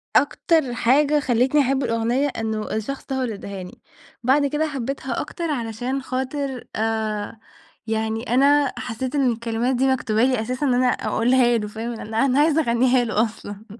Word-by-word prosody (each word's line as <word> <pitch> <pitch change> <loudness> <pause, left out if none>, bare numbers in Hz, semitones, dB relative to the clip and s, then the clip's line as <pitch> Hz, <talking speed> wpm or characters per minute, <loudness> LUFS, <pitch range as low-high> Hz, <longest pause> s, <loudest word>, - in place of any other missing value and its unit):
أكتر 285 -2 +2
حاجة 285 +5 +3
خلتني 260 +2 +2
أحب 270 +1 +1
الأغنية 235 +4 +1
إنه 220 -4 -3
الشخص 245 +6 -4
ده 270 - -3
هو 265 - -1
اللي 235 -4 -2
اداهاني. 200 +3 -8 0.4
بعد 280 +3 +3
كده 300 +3 0
حبيتها 270 -1 -3
أكتر، 325 +1 -4
علشان 245 +1 -3
خاطرآآ 225 -6 -3 0.5
يعني 220 +1 -1
أنا 280 +1 +4
حسيت 255 +4 -4
إن 265 -4 +3
الكلمات 235 +2 -1
دي 265 +2 +2
مكتوبة 235 -4 +1
لي 255 -3 +2
أساسًا. 255 +5 -2
أن 255 - +2
أنا 250 +1 +3
أقولها 240 +1 +2
له 210 -1 -3
فاهم؟ 225 +3 -5
أن 220 - -8
أنا 270 +4 +2
عايزة 315 +1 +4
أغنيهاله 240 -3 +2
أصلًا. 205 -1 -9
250 Hz, 155 wpm, -22 LUFS, 225-275 Hz, 0.5 s, أنا